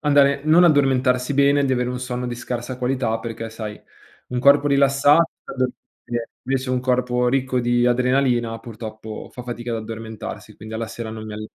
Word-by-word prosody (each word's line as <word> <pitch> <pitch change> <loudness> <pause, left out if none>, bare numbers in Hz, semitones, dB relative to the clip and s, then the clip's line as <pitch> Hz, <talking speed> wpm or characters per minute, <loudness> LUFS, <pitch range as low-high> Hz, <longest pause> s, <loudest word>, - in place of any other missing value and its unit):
andare 140 -1 +4
non 165 +3 +6
addormentarsi 130 -3 +3
bene, 140 0 +4
di 130 - +1
avere 125 0 0
un 125 - -3
sonno 125 0 -3
di 120 - -3
scarsa 120 +1 -5
qualità, 125 -3 0
perché 115 0 -6
sai, 110 -2 -7 0.5
un 125 - -2
corpo 140 +2 +5
rilassato 140 +3 +5
ti - - -14
fa - - -8
dormire 130 -1 -1 0.3
bene, 120 -1 -3 0.2
invece 130 -1 -1
un 125 -1 +1
corpo 125 -1 +1
ricco 130 -1 +1
di 120 0 +2
adrenalina 125 -2 +2
purtroppo 110 -2 -8
fa 125 - -8
fatica 120 -1 -5
ad 115 - -1
addormentarsi, 110 0 -7
quindi 110 +1 -10
alla 115 0 -3
sera 115 0 -6
non 110 -1 -7
mi 105 - -6
all 110 0 -6
125 Hz, 190 wpm, -22 LUFS, 115-135 Hz, 0.5 s, non